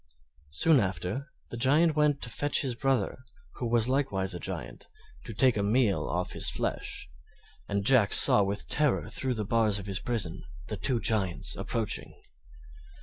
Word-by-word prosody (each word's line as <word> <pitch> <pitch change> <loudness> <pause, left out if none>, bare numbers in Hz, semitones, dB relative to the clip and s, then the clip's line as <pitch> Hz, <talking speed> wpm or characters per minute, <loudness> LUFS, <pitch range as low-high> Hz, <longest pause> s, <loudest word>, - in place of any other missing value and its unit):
Soon 140 - +3
after, 95 - -3 0.2
the 120 - -6
Giant 150 +6 +3
went 150 -2 +1
to 115 - -3
fetch 145 +5 +1
his 130 -3 -1
brother, 130 -3 -1 0.4
who 120 - -3
was 115 -1 +2
likewise 100 -9 -1
a 90 - -6
Giant, 80 -11 -7 0.4
to 115 - -7
take 125 +2 +3
a - - 0
meal 105 0 +1
off - - -3
his - - 0
flesh, - - -4 0.6
and 100 0 -2
Jack 120 -6 +4
saw - - +8
with 100 +1 -3
terror 150 -3 0
through 130 -2 -2
the 105 -2 -4
bars 110 -1 +1
of 100 - -7
his 100 -1 -3
prison 105 -9 -3 0.3
the 105 - -3
two 125 +4 +1
Giants 100 -5 0
approaching. 115 -3 -3
115 Hz, 165 wpm, -28 LUFS, 100-130 Hz, 0.6 s, saw